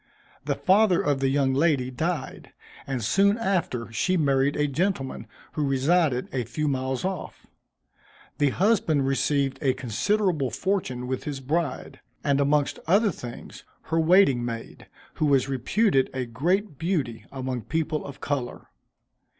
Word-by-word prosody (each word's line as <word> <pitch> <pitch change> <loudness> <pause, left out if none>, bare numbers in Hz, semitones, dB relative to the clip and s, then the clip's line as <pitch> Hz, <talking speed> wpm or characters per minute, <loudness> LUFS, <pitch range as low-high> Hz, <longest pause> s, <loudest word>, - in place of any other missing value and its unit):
The - - 0
father 190 -1 +4
of 145 -2 +1
the 135 0 +1
young 135 -1 +2
lady 140 -3 +2
died, 155 +1 -4 0.3
and 130 -4 -2
soon 200 - +3
after 175 - -1
she 185 +10 +1
married 140 -2 +2
a 150 - +2
gentleman 145 -2 -2 0.2
who 150 - -2
resided 135 0 +2
a 130 -2 0
few 125 +7 -3
miles 130 +1 -1
off. 190 -1 -5 0.9
The 145 - +4
husband 170 - +2
received 135 0 0
a 135 -3 +2
considerable 150 - 0
fortune 130 - -2
with 130 +3 -4
his 145 -3 -4
bride, 135 -1 -3 0.2
and 140 -1 +2
amongst 145 0 +1
other 200 +4 +4
things, 120 -6 -9 0.3
her 165 - +3
waiting 160 -7 +4
maid, 115 -1 -6 0.3
who 155 - +1
was 135 -2 +3
reputed 135 - +1
a 130 -1 -1
great 160 - -1
beauty 145 - -2
among 130 -2 -4
people 160 +3 -1
of 140 -1 -9
color. 135 -4 -4
140 Hz, 140 wpm, -25 LUFS, 130-170 Hz, 0.9 s, father